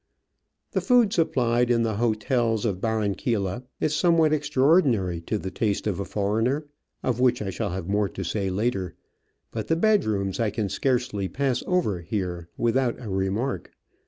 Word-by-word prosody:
The - - 0
food 245 -5 +4
supplied 125 -7 +2
in 115 -1 +3
the 110 -3 -1
hotels 115 0 +1
of 95 -4 -1
Barranquilla 110 0 -1
is 150 - 0
somewhat 165 -2 +4
extraordinary 135 - +2
to 105 +6 -2
the 95 -2 -5
taste 105 0 -1
of 100 -3 -1
a 100 - -2
foreigner 115 +8 0 0.2
— - - -50
of 125 -2 0
which 125 -1 +3
I 95 -2 -3
shall 105 +2 -2
have 90 -1 -4
more 100 0 +1
to 95 - -6
say 95 +2 -1
later 95 -1 -1 0.3
— - - -48
but - - -4
the 165 - +2
bedrooms 110 - +1
I 115 -2 +2
can 105 -1 -2
scarcely 120 -2 0
pass 130 +5 -1
over 160 - +1
here 90 -2 -4
without 120 +1 +1
a 115 - -7
remark. 95 +7 -2
110 Hz, 170 wpm, -25 LUFS, 100-130 Hz, 0.3 s, food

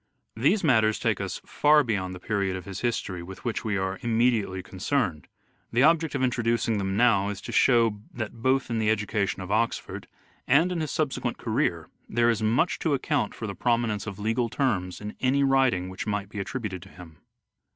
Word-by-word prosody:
These 150 - +2
matters 110 -7 +3
take - - 0
us - - -4
far 150 0 +4
beyond 95 -6 -2
the - - -9
period 100 -1 -1
of 95 - -7
his 95 -1 -6
history 100 -7 -2
with 95 +6 -10
which 120 - -2
we 105 -2 -1
are 95 0 -2
immediately 115 -5 +1
con 95 +1 -12
cerned: 95 - 0 0.5
the 120 +3 +3
object 160 -1 +3
of 135 - 0
introducing 115 -3 +1
them 95 0 -2
now 105 -4 +4
is 100 -2 -5
to - - -7
show 115 -5 +3
that 110 -3 -5
both 130 0 +1
in 115 - 0
the 110 -1 +1
education 105 -3 0
of 95 - -7
Oxford, 115 +2 -1 0.4
and 180 +3 +4
in 170 -2 -2
his 155 - -2
subsequent 150 -4 -1
career, - - -1 0.2
there 120 +1 +3
is 110 - -2
much 115 +11 +1
to 155 -4 +1
account 145 +2 -1
for 115 - -6
the 100 - -4
prominence 115 -3 0
of 100 -2 -5
legal 115 +3 0
terms 100 -10 -1
in 105 0 -6
any 135 +2 +2
writing 135 -9 +2
which 95 +3 -6
might 100 -2 -2
be 105 - -6
attributed 100 -3 -4
to 95 - -13
him. 85 -5 -14
110 Hz, 200 wpm, -26 LUFS, 95-125 Hz, 0.5 s, far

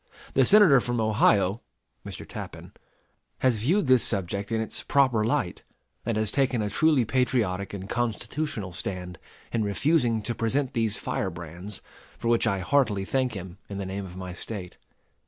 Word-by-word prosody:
The 130 - +4
Senator 195 -9 +7
from 120 -1 -2
Ohio 105 -1 +3 0.4
[Mr. - - -8
Tappan] - - -8 0.6
has 125 -4 +2
viewed 175 - +2
this 130 -2 +5
subject 100 +1 -2
in 110 - +1
its 110 - -1
proper 130 -6 +3
light, 115 -5 -1 0.5
and 115 -2 0
has 110 -1 0
taken 135 -3 +1
a 105 -1 -1
truly 155 -6 +3
patriotic 110 -6 0
and 95 -1 -6
constitutional 120 -1 -2
stand 90 0 -5 0.3
in 115 -2 0
refusing 115 +1 +1
to 120 - -1
present 125 +4 0
these 115 -3 0
firebrands, 90 +2 -4 0.3
for 115 - -2
which 115 -1 +3
I 100 -1 0
heartily 105 -3 +2
thank 130 +2 0
him 95 -1 -8
in 100 - -5
the 100 - -3
name 95 +1 -4
of 90 0 -11
my 90 -1 -6
State. 90 0 -6
110 Hz, 160 wpm, -27 LUFS, 95-130 Hz, 0.6 s, Senator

